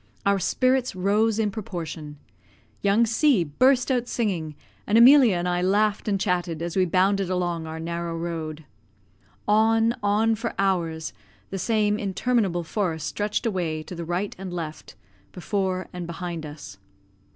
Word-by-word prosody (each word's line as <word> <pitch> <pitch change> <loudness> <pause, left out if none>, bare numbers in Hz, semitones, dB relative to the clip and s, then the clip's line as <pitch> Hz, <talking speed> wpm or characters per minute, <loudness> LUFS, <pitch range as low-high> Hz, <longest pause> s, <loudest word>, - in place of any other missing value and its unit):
Our 200 0 +3
spirits 255 +3 +1
rose 205 +4 +2
in 215 -2 +1
proportion. 165 -7 -6 0.6
Young 205 +4 +3
C 230 - +3
burst 250 - +2
out 245 -2 0
singing, 175 -12 -2 0.3
and 210 - +3
Emilia 245 -3 +7
and 175 +1 -1
I 175 0 0
laughed 205 +3 +1
and 200 -2 +1
chatted 175 -4 -1
as 170 -1 -4
we 190 -1 +3
bounded 190 +2 +2
along 175 -3 -2
our 160 0 -6
narrow 170 0 -4
road. 160 -2 -5 0.8
On, 225 +2 +3
on 210 +2 +2
for 225 +2 -4
hours, 170 -5 -1 0.4
the 195 - -3
same 210 0 +1
interminable 195 -2 0
forest 165 -3 -2
stretched 210 +3 -2
away 170 -7 -1
to 180 - -9
the 170 -1 -5
right 175 +4 -2
and 190 -1 -6
left, 165 -3 -6 0.4
before 185 0 -2
and 180 -1 -5
behind 170 -2 -5
us. 145 -10 -10
190 Hz, 150 wpm, -25 LUFS, 170-215 Hz, 0.8 s, Emilia